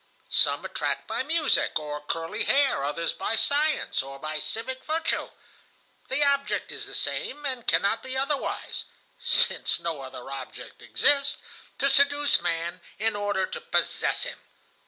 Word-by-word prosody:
"Some - - +3
attract - - -2
by - - -2
music 300 0 +3
or 150 -1 -5
curly 165 +7 -2
hair, 275 - +3
others 150 +4 -1
by 210 +4 -1
science 295 +6 +2
or 135 +1 -9
by 155 +2 -3
civic 260 +9 -4
virtue. 320 +1 -1 0.8
The 265 +3 +1
object 280 0 0
is - - -5
the - - -6
same, 295 0 -2
and 255 -4 -2
cannot 220 +3 +3
be 260 +2 -5
otherwise 275 +1 -2 0.4
(since - - +3
no 165 -4 -3
other 130 0 -9
object 135 -2 -8
exists),—to 280 -1 +2
seduce 285 -1 +4
man 170 0 -2 0.2
in 220 +1 0
order 205 -2 0
to 480 - -7
possess 475 +1 +1
him. - - -4
235 Hz, 140 wpm, -26 LUFS, -, 0.8 s, seduce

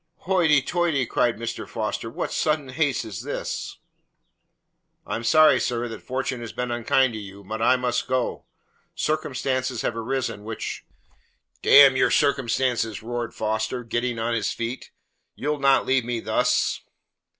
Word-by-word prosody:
"Hoity 165 -7 +3
toity!" 165 -5 0
cried 120 -1 +1
Mr. 115 +1 -5
Foster. 110 0 -3
"What - - -4
sudden 150 -3 0
haste 145 0 0
is 110 -4 -6
this?" - - -5 1.3
"I 105 - -3
am 115 - -4
sorry, 150 +2 +6
sir, 120 0 -1
that 115 - -8
Fortune 130 -1 -3
has 115 - -6
been 125 -1 -3
unkind 120 +2 +2
to 110 - -5
you, 100 -1 -10
but 110 +3 -5
I 125 +3 +5
must 125 -1 -1
go. 130 -1 -1 0.5
Circumstances 130 -4 -1
have 115 - -1
arisen 115 -2 -3
which 110 +1 -5 0.4
" - - -41
"D 140 - +8
n 135 -2 +7
your 130 - +3
circumstances!" 125 -5 +1
roared 120 0 -4
Foster, 110 +3 -2
get 120 +1 -1
ting 120 -1 -2
on 115 +1 -1
his 115 - 0
feet. 115 +3 -5 0.5
"You'll 150 +1 -2
not 135 -1 +4
leave 130 -1 +2
me 120 0 -2
thus!" - - +1
125 Hz, 160 wpm, -24 LUFS, 115-135 Hz, 1.3 s, D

